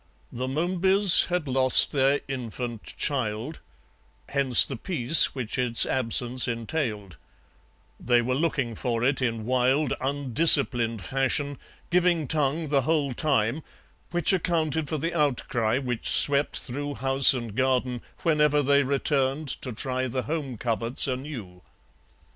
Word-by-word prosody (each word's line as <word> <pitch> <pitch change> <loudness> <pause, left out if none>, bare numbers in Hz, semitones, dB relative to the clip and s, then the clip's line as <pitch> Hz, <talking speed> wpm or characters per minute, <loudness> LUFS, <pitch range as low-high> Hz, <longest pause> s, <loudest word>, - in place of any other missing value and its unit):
The 130 +2 -5
Momebys 185 +6 +2
had 180 -4 -3
lost 130 -1 +4
their 140 0 0
infant 120 -3 -7
child; 130 +1 -3 0.7
hence 135 -3 +5
the 135 - -7
peace 145 - +4
which 125 -2 -4
its 120 -2 +3
absence 125 0 0
entailed; 115 - -5 0.8
they 120 0 +1
were 120 +2 -2
looking 140 -4 -2
for 115 +1 -4
it 135 +2 0
in 115 -3 -3
wild, 130 +3 0
undisciplined 130 -4 +3
fashion, 135 +1 -2 0.3
giving 175 -4 0
tongue 155 +1 -2
the 140 -1 +1
whole 145 -1 -2
time, 130 -1 -1 0.5
which 175 +1 +1
accounted 160 -4 -2
for 155 - -3
the 165 +4 -4
outcry 125 -7 -1
which 125 -3 -3
swept 140 0 +4
through 145 +3 -6
house 135 +1 +4
and 115 -4 -7
garden 130 -1 -1 0.2
whenever 150 -3 +1
they 140 +1 +2
returned 140 +1 -1
to 130 - -1
try 130 +3 -4
the 130 +1 -4
home 145 -5 -5
coverts 115 +2 -2
anew. 125 -9 -7
135 Hz, 130 wpm, -24 LUFS, 120-150 Hz, 0.8 s, hence